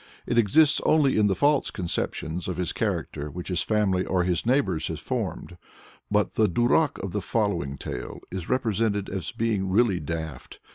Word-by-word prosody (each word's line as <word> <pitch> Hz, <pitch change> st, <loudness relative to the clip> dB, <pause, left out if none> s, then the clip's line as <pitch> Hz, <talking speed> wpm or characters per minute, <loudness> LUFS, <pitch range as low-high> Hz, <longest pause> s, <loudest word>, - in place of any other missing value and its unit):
It 120 Hz, 0 st, +2 dB
exists 140 Hz, +8 st, +4 dB
only 150 Hz, -4 st, +3 dB
in 105 Hz, -1 st, +4 dB
the 95 Hz, -, +1 dB
false 145 Hz, +7 st, +2 dB
conceptions 85 Hz, -2 st, -3 dB
of 90 Hz, -3 st, -3 dB
his 90 Hz, -2 st, -1 dB
character 75 Hz, +1 st, -2 dB
which 90 Hz, +5 st, -7 dB
his 90 Hz, -2 st, +1 dB
family 100 Hz, -4 st, +1 dB
or 95 Hz, -2 st, +1 dB
his 90 Hz, +4 st, 0 dB
neighbors 95 Hz, -, +1 dB
have -, -, -4 dB
formed. 90 Hz, -, -4 dB, 0.5 s
But 105 Hz, 0 st, +1 dB
the 110 Hz, -2 st, +3 dB
duràk 120 Hz, -, +2 dB
of 95 Hz, -, -3 dB
the 105 Hz, -, -2 dB
following 100 Hz, -13 st, -1 dB
tale -, -, -6 dB
is 90 Hz, -2 st, -5 dB
represented 110 Hz, -5 st, 0 dB
as 95 Hz, -4 st, -4 dB
being 105 Hz, -4 st, -1 dB
really 100 Hz, -2 st, +3 dB
"daft." 80 Hz, 0 st, -6 dB
100 Hz, 175 wpm, -26 LUFS, 90-115 Hz, 0.5 s, exists